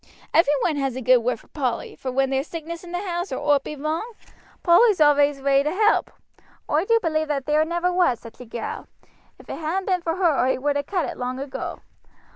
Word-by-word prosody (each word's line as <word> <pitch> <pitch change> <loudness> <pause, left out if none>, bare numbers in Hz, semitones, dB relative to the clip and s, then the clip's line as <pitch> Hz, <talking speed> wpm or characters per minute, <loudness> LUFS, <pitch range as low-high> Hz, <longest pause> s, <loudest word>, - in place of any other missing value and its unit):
Every 295 -3 +4
one 315 -4 +1
has 270 -3 -1
a 260 - -4
good 255 +1 +5
word 235 0 -1
for - - -22
Polly; 255 -6 -3
for 260 - -5
when 270 +1 +1
there's 270 +3 -1
sickness 335 +1 -7
in 350 - -10
the 360 +3 -3
house, 350 +1 -3
or - - -2 0.2
owt 280 -1 +2
be 300 - -6
wrong, 315 - -3 0.5
Polly's 380 +3 +5
always 290 -2 +4
ready 275 0 +3
to 300 - +1
help. 425 +4 +2 0.6
Oi 310 +5 +1
do 460 +2 +3
believe 315 -4 -1
that 280 -3 -2
there 300 +1 +3
never 345 +2 -1
was 350 -10 +2
such 230 -1 -13
a 250 - -9
gal. 230 0 -6 0.5
If - - -17
it - - -6
hadn't 340 +5 -2
been 365 -2 0
for 330 -1 -2
her 345 -6 +2
oi 260 0 +1
would 285 +2 0
ha' 285 0 -2
cut 370 -4 0
it - - -6
long 250 +1 -3
ago. 275 0 -6
300 Hz, 230 wpm, -23 LUFS, 270-345 Hz, 0.6 s, good